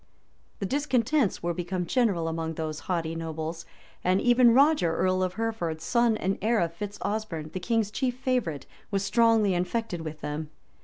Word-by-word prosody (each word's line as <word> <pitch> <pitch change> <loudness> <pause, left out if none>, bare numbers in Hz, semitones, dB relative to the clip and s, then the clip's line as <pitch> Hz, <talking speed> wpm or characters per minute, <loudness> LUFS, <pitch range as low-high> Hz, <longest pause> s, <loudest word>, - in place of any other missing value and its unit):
The 200 - -3
discontents 260 - +1
were 175 0 0
become 180 +1 -3
general 195 -7 +1
among 160 0 -3
those 155 -1 -4
haughty 165 -3 0
nobles; 165 0 -5 0.4
and 185 +1 +3
even 245 0 +5
Roger, 270 - +4
earl 185 +1 +1
of 185 0 -1
Hereford, 215 -8 -2
son 235 +6 +2
and 195 0 -1
heir 225 +2 +2
of 170 -1 0
Fitz 205 +3 -6
Osberne, 200 -8 -3
the 185 - -3
king's 220 +2 0
chief 250 +1 -1
favorite, 245 - -1 0.2
was 195 -1 -1
strongly 225 -4 +4
infected 180 +1 -2
with 155 -1 -7
them. 150 +1 -4
185 Hz, 165 wpm, -27 LUFS, 165-230 Hz, 0.4 s, even